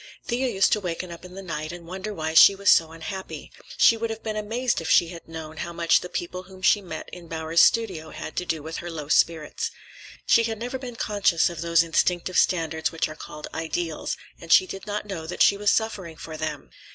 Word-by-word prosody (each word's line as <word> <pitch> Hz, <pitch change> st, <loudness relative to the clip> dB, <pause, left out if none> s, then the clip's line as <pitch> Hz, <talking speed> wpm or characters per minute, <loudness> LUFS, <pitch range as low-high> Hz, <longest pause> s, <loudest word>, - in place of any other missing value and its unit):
Thea 255 Hz, +1 st, 0 dB
used 195 Hz, -5 st, +2 dB
to 210 Hz, -, +3 dB
waken 180 Hz, -1 st, -4 dB
up 170 Hz, -, -10 dB
in 180 Hz, 0 st, -11 dB
the 195 Hz, -, -7 dB
night 155 Hz, -3 st, -4 dB
and 175 Hz, -1 st, -9 dB
wonder 190 Hz, +4 st, -5 dB
why 160 Hz, -4 st, -3 dB
she 195 Hz, +4 st, +9 dB
was 200 Hz, 0 st, +4 dB
so 160 Hz, -1 st, +4 dB
unhappy. 165 Hz, +4 st, -7 dB, 0.3 s
She 230 Hz, -, +6 dB
would 225 Hz, 0 st, -3 dB
have 225 Hz, 0 st, -6 dB
been 215 Hz, -1 st, -3 dB
amazed 225 Hz, +1 st, -1 dB
if 165 Hz, -, -4 dB
she 170 Hz, -, +5 dB
had 170 Hz, -1 st, -10 dB
known 160 Hz, -1 st, -8 dB
how 170 Hz, -, -4 dB
much 170 Hz, 0 st, +3 dB
the 180 Hz, -, -7 dB
people 175 Hz, +1 st, -4 dB
whom 185 Hz, 0 st, -15 dB
she 205 Hz, -, +5 dB
met 165 Hz, -5 st, -7 dB
in 175 Hz, -2 st, -11 dB
Bowers's 160 Hz, 0 st, +2 dB
studio 190 Hz, -9 st, +2 dB
had -, -, -8 dB
to -, -, 0 dB
do 160 Hz, -3 st, -2 dB
with 160 Hz, +1 st, -5 dB
her 175 Hz, -, -6 dB
low 155 Hz, -3 st, -6 dB
spirits. 165 Hz, -, +1 dB, 0.6 s
She -, -, +5 dB
had 225 Hz, -1 st, -3 dB
never 245 Hz, +4 st, -4 dB
been 250 Hz, -2 st, -7 dB
conscious 200 Hz, -7 st, +2 dB
of 165 Hz, -2 st, -7 dB
those 170 Hz, 0 st, +4 dB
instinctive 175 Hz, +2 st, +1 dB
standards 160 Hz, -3 st, +1 dB
which 165 Hz, -, -1 dB
are 155 Hz, -, -9 dB
called 150 Hz, 0 st, -9 dB
ideals, 165 Hz, 0 st, -3 dB, 0.2 s
and 165 Hz, -, -8 dB
she 185 Hz, -, +7 dB
did 195 Hz, +2 st, -8 dB
not 210 Hz, 0 st, -3 dB
know 175 Hz, -6 st, -6 dB
that 180 Hz, -, +2 dB
she -, -, +5 dB
was 205 Hz, 0 st, +1 dB
suffering 195 Hz, -7 st, -1 dB
for 160 Hz, -1 st, -8 dB
them. 155 Hz, -2 st, -5 dB
175 Hz, 230 wpm, -25 LUFS, 160-205 Hz, 0.6 s, she